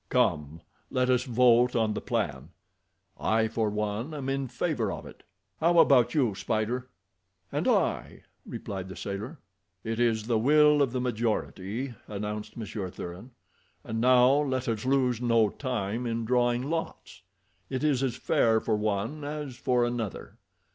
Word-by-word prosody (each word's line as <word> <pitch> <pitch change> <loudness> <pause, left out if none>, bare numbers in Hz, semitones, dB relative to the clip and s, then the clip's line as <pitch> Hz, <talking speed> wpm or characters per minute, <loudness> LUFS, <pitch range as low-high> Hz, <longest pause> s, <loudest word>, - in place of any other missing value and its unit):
"Come, 80 - 0 0.3
let 130 0 +1
us 125 0 +2
vote 125 0 +4
on 110 -2 +2
the - - -4
plan; - - -2 0.7
I 110 0 +2
for 110 -1 -1
one 105 +7 -3
am 135 -2 -4
in 135 0 -1
favor 145 +6 -1
of - - -7
it. - - -12 0.4
How 170 +2 +3
about 135 -4 +5
you, 125 -8 +2
Spider?" 115 +5 -2 0.6
"And - - -1
I," - - 0 0.2
replied 95 -2 -6
the 95 - -8
sailor. 105 +10 -5 0.5
"It 115 +1 -3
is 115 -3 +2
the 115 0 +1
will 150 +4 +5
of 135 -4 +2
the 125 - -2
majority," 115 0 -2
announced 105 +1 -5
Monsieur 105 -4 -5
Thuran, 90 +7 -8 0.5
"and 110 0 -3
now 125 +1 +6
let 130 -3 -2
us 115 0 -2
lose 130 -3 +2
no 115 -3 +3
time 120 -1 -3
in 115 0 -2
drawing 120 +1 +2
lots. 165 +1 -5 0.5
It 130 +1 -3
is 145 -4 +2
as 130 -3 0
fair 110 -1 +2
for 110 0 0
one 110 +8 -2
as 145 -3 -5
for 125 -1 +1
another. 120 -5 -5
120 Hz, 155 wpm, -28 LUFS, 110-130 Hz, 0.7 s, now